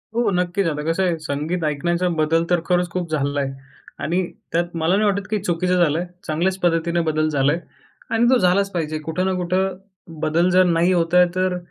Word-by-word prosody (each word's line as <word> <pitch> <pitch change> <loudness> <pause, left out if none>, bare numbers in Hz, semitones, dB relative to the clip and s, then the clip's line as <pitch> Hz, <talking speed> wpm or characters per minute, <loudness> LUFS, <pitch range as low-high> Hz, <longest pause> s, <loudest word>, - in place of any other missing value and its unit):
हो 235 -2 +2
नक्कीच, 180 +2 0
आता 150 -2 -2
कसंय 180 0 +1
संगीत 155 +3 -3
ऐकण्याचा 170 +4 0
बदल 160 +2 +2
तर 175 - +3
खरंच 180 -1 +1
खूप 175 -1 -3
झालाय. 140 -2 -1 0.5
आणि 175 +4 0 0.3
त्यात 170 +1 -1
मला 165 +3 +1
नाही 210 +2 +2
वाटत, 200 -1 -2
की 215 - 0
चुकीचं 180 +1 0
झालंय, 165 +2 0 0.2
चांगल्याच 175 +5 0
पद्धतीने 170 -1 +1
बदल 155 0 +1
झालाय 145 +2 +1 0.5
आणि 230 +1 +3
तो 255 - +5
झालाच 195 +1 +2
पाहिजे, 155 -3 -2
कुठं 160 +4 -2
ना 190 - +1
कुठं 185 +2 -1 0.4
बदल 170 +4 +2
जर 185 0 +5
नाही 170 +1 +2
होत 170 -1 0
आहे 180 0 +7
तर 185 -1 0
175 Hz, 185 wpm, -21 LUFS, 160-185 Hz, 0.5 s, आहे